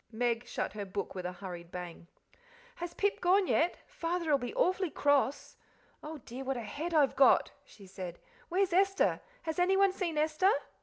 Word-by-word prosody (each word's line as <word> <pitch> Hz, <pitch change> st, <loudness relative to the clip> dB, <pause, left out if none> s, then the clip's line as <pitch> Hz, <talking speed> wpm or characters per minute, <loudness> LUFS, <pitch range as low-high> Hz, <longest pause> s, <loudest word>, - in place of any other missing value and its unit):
Meg 240 Hz, +1 st, -1 dB
shut -, -, -3 dB
her 210 Hz, -1 st, -4 dB
book 195 Hz, 0 st, -4 dB
with 180 Hz, -2 st, -4 dB
a -, -, -4 dB
hurried 175 Hz, -2 st, -8 dB
bang. 175 Hz, -2 st, -7 dB, 0.7 s
"Has 345 Hz, -4 st, -6 dB
Pip 405 Hz, 0 st, 0 dB
gone 375 Hz, +2 st, +4 dB
yet? 345 Hz, 0 st, +2 dB
Father'll 335 Hz, -, 0 dB
be 245 Hz, -1 st, -4 dB
awfully 370 Hz, 0 st, +2 dB
cross. 285 Hz, -2 st, +1 dB, 0.4 s
Oh 310 Hz, +1 st, -7 dB
dear, 255 Hz, 0 st, -8 dB
what 265 Hz, -1 st, -2 dB
a 240 Hz, -, -4 dB
head 300 Hz, +11 st, -4 dB
I've 290 Hz, -3 st, +4 dB
got!" 275 Hz, -, +5 dB
she 200 Hz, -, -16 dB
said. 185 Hz, -2 st, -7 dB, 0.3 s
"Where's 370 Hz, 0 st, +1 dB
Esther? 390 Hz, +1 st, +3 dB, 0.2 s
Has 320 Hz, +2 st, -3 dB
anyone 385 Hz, +2 st, +4 dB
seen 345 Hz, -5 st, -2 dB
Esther?" 310 Hz, +6 st, +3 dB
300 Hz, 170 wpm, -32 LUFS, -, 0.7 s, got